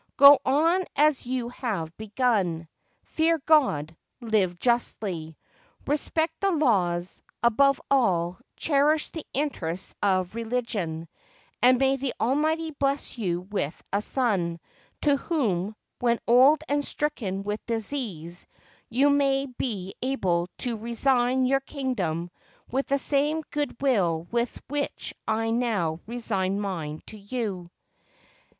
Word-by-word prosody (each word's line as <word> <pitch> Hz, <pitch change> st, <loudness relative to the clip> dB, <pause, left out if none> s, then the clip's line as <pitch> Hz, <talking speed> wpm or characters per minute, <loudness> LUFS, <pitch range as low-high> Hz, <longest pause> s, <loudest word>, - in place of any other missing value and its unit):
Go 280 Hz, 0 st, +10 dB
on 325 Hz, +7 st, +3 dB
as 295 Hz, -4 st, +2 dB
you 250 Hz, -2 st, -2 dB
have 195 Hz, -11 st, -4 dB
begun. 205 Hz, -7 st, 0 dB, 0.4 s
Fear 325 Hz, +1 st, +1 dB
God; 165 Hz, -, +3 dB, 0.2 s
live 210 Hz, -7 st, +1 dB
justly; 190 Hz, -9 st, -1 dB, 0.5 s
respect 315 Hz, +2 st, 0 dB
the 395 Hz, -, +3 dB
laws; 185 Hz, -, +1 dB, 0.2 s
above 275 Hz, +4 st, +4 dB
all, 185 Hz, -9 st, +2 dB, 0.2 s
cherish 295 Hz, +1 st, +2 dB
the 320 Hz, -, -6 dB
interests 190 Hz, -, -3 dB
of 185 Hz, -2 st, +1 dB
re 230 Hz, +1 st, -4 dB
ligion, 205 Hz, -9 st, -3 dB, 0.5 s
and 255 Hz, +1 st, +6 dB
may 270 Hz, +1 st, +2 dB
the 270 Hz, -1 st, -3 dB
Almighty 315 Hz, +6 st, +1 dB
bless 275 Hz, -3 st, -2 dB
you 175 Hz, -5 st, -1 dB
with 185 Hz, -5 st, -3 dB
a 200 Hz, -, +2 dB
son, 195 Hz, -10 st, 0 dB, 0.4 s
to 285 Hz, -2 st, +3 dB
whom, 215 Hz, -, -1 dB, 0.2 s
when 235 Hz, -1 st, +2 dB
old 270 Hz, +6 st, +6 dB
and 290 Hz, 0 st, +1 dB
stricken 225 Hz, -12 st, -2 dB
with 210 Hz, +1 st, -4 dB
disease, 215 Hz, -, -4 dB, 0.4 s
you 260 Hz, +5 st, +3 dB
may 275 Hz, -1 st, +2 dB
be 220 Hz, -7 st, -4 dB
able 185 Hz, -10 st, 0 dB
to 240 Hz, -3 st, -2 dB
resign 245 Hz, +3 st, +2 dB
your 270 Hz, +2 st, +3 dB
kingdom 195 Hz, -, -3 dB, 0.4 s
with 270 Hz, +3 st, -1 dB
the 280 Hz, -, +2 dB
same 295 Hz, +3 st, +1 dB
good 290 Hz, -5 st, -2 dB
will 185 Hz, -12 st, +1 dB
with 235 Hz, +1 st, -1 dB
which 285 Hz, +1 st, -3 dB
I 225 Hz, +1 st, 0 dB
now 210 Hz, -10 st, 0 dB
resign 205 Hz, -5 st, -1 dB
mine 165 Hz, -7 st, -4 dB
to 215 Hz, -, -9 dB
you." 200 Hz, -5 st, -4 dB
235 Hz, 125 wpm, -26 LUFS, 185-275 Hz, 0.5 s, Go